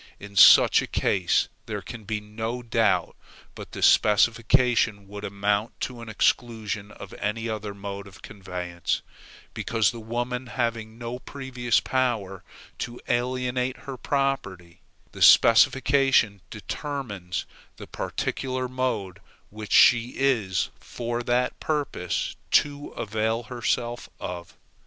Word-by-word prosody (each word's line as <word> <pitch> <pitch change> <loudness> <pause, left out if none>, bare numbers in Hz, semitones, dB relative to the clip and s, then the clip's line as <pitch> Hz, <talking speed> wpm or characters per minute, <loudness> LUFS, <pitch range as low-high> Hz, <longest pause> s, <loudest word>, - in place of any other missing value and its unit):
In 100 0 -11
such 90 - +8
a - - -5
case 90 -4 +1 0.2
there - - -4
can 115 -3 -9
be 105 +1 -2
no 110 +3 -5
doubt 115 -1 +1 0.4
but - - -10
the - - -4
specification 115 0 +3
would 100 +1 -9
amount 100 +2 -1
to 125 -2 -4
an 115 - -8
exclusion 110 -2 -1
of 100 -1 -11
any 115 +3 -2
other 105 -2 -4
mode 100 0 -7
of 100 0 -15
conveyance, 90 -3 -4 0.5
because 110 -5 +1
the 115 - -9
woman 120 +3 -3
having 115 -3 -3
no 120 +1 -5
previous 130 -4 -1
power 115 -8 -1 0.4
to 120 0 -5
alienate 125 +1 -1
her 135 - -5
property, 115 - -2 0.3
the - - -11
specification 130 -3 +5
determines 105 - -5 0.3
the - - -9
particular 130 -1 -3
mode 120 -7 -3 0.3
which 105 0 -8
she 120 0 +5
is, 110 -9 +1
for 120 0 -4
that 125 +1 0
purpose, 145 - -2
to 145 -1 +2
avail 110 +2 -1
herself 120 +1 -2
of. 85 -2 -7
115 Hz, 120 wpm, -25 LUFS, 100-125 Hz, 0.5 s, such